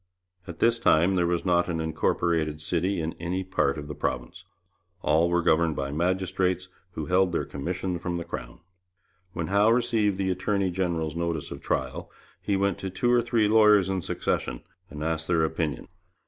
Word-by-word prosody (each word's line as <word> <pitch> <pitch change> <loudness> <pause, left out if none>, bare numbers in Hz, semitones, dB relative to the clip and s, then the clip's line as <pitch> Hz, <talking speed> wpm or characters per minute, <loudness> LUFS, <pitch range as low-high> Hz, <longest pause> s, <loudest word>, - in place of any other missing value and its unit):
At 85 -2 -7
this 115 +3 +3
time 90 -3 +4
there 90 -2 +2
was 85 +1 -1
not 90 -1 +2
an 85 -2 -1
incorporated 80 -1 0
city 90 +4 -1
in 80 +1 -3
any 90 +3 -2
part 80 -6 0
of 75 -1 -6
the 75 - -5
province. - - -4 0.6
All 85 +2 +3
were 85 0 +1
governed 80 -2 +3
by 70 0 -3
magistrates 90 +2 0 0.2
who 80 - -4
held 90 +2 +2
their 85 - -1
commission 90 +4 -3
from 90 0 -3
the 85 - -4
Crown. - - -7 0.7
When 85 -2 -3
Howe 105 +2 +5
received 115 -4 +2
the 95 -1 0
attorney 95 +1 0
general's 85 -4 -2
notice 85 -3 -2
of - - -7
trial, - - -2 0.3
he 100 -2 0
went 100 -1 0
to 95 - -4
two 120 +6 0
or 120 -1 +5
three 115 -2 +2
lawyers 105 -3 +5
in 95 -1 -1
succession, - - -2 0.3
and 75 0 -6
asked 80 0 -2
their 80 -2 +3
opinion. 80 -2 -3
85 Hz, 180 wpm, -26 LUFS, 80-95 Hz, 0.7 s, Howe